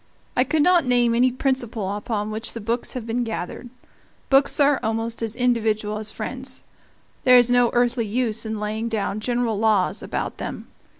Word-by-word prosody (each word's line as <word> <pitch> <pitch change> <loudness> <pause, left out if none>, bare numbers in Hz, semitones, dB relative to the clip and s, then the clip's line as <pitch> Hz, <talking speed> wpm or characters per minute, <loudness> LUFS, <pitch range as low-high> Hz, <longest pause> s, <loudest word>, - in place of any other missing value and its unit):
I 250 - +4
could 295 +3 +1
not 355 -1 +4
name 245 -2 +2
any 250 +2 +3
principle 240 -6 -2
upon 210 0 -3
which 220 +2 -4
the 230 - -6
books 230 +3 -2
have 250 -3 -5
been 235 +2 -1
gathered. 225 +1 -5 0.6
Books 275 +2 +4
are 285 -1 +4
almost 225 0 -2
as 225 -1 -2
individual 220 -4 0
as 215 0 -4
friends. 260 +4 -5 0.6
There 250 0 +7
is 245 0 +7
no 245 -1 +4
earthly 240 -1 +1
use 225 0 -1
in 220 -1 -4
laying 215 +2 -3
down 215 -2 -2
general 240 -2 -1
laws 210 -2 +2
about - - -4
them. - - -6
230 Hz, 175 wpm, -23 LUFS, 215-250 Hz, 0.6 s, There